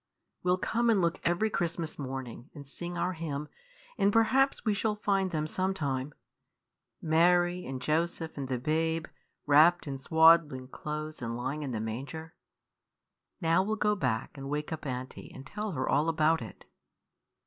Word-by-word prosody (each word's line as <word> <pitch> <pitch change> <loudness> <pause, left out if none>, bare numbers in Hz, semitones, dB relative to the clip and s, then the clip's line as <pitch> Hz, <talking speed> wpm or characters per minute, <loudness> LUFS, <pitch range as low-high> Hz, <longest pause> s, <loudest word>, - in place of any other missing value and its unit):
"We 180 - -1
'll 180 - +3
come 235 +5 0
and 220 -4 +4
look 170 -2 +1
every 175 +6 +1
Christmas 170 -4 -2
morning, 130 -1 -6
and 140 -2 -10
sing 175 +5 -6
our 180 +2 0
hymn, 150 -3 -4 0.5
and 200 - +4
perhaps 245 +6 +3
we 215 - +3
shall 210 +1 0
find 195 -2 +1
them 155 -3 -1
some 185 +4 -1
time 140 -3 -2 0.9
Mary, 175 +2 +3
and 130 0 -4
Joseph, 160 +4 -1
and 140 -2 -4
the 130 -1 -1
babe, 160 +4 0 0.4
wrapped 155 +5 +5
in 135 -2 -5
swaddling 160 -3 +4
clothes 155 +1 -5
and 115 0 -3
lying 140 +5 -3
in 145 - -3
the 115 -4 -3
manger. 140 +9 -5 1.1
Now 165 +2 +3
we'll 215 +3 -1
go 210 -1 +2
back, 125 - -2
and 135 -1 -7
wake 150 +2 -2
up 155 -2 -6
aunty, 130 0 -6
and 130 - -10
tell 210 +8 -4
her 130 -2 -2
all 150 +3 +2
about 160 -1 +2
it." 110 -4 -10
160 Hz, 170 wpm, -30 LUFS, 135-175 Hz, 1.1 s, wrapped